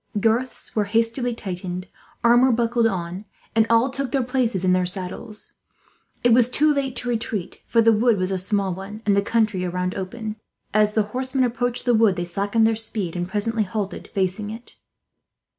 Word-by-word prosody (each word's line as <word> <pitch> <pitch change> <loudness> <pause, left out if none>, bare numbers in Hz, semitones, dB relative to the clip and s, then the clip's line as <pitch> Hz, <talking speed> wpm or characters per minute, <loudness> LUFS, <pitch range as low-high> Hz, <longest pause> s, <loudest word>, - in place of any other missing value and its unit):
Girths 230 +4 -1
were 210 -2 +2
hastily 230 +3 0
tightened, 185 -3 -5 0.4
armour 240 +2 +5
buckled 235 0 +2
on, 185 -1 -4 0.3
and 225 0 +4
all 230 +3 +4
took 270 -2 -3
their 270 -2 +1
places 240 -7 0
in 180 - +4
their 185 0 +2
saddles. 190 +4 -6 0.7
It 240 -1 +5
was 240 0 +5
too 300 +4 +3
late 270 -2 -2
to 245 - -3
retreat, 220 -5 -3
for 230 -1 +3
the 225 0 +6
wood 225 0 +3
was 185 0 -1
a 190 - -1
small 195 0 0
one, 200 +4 -8
and 205 - +3
the 200 - +3
country 215 -3 +1
around 180 0 -2
open. 215 +3 -5 0.4
As 210 0 +3
the 215 - +4
horsemen 260 +1 0
approached 245 0 -1
the 245 - +3
wood 220 -4 +4
they 175 -1 -2
slackened 200 +5 +1
speed; 205 -6 -3
and 175 0 -3
presently 215 +3 0
halted, 205 0 -3
facing 195 +2 -1
it. 225 +3 -9
220 Hz, 180 wpm, -23 LUFS, 190-235 Hz, 0.7 s, the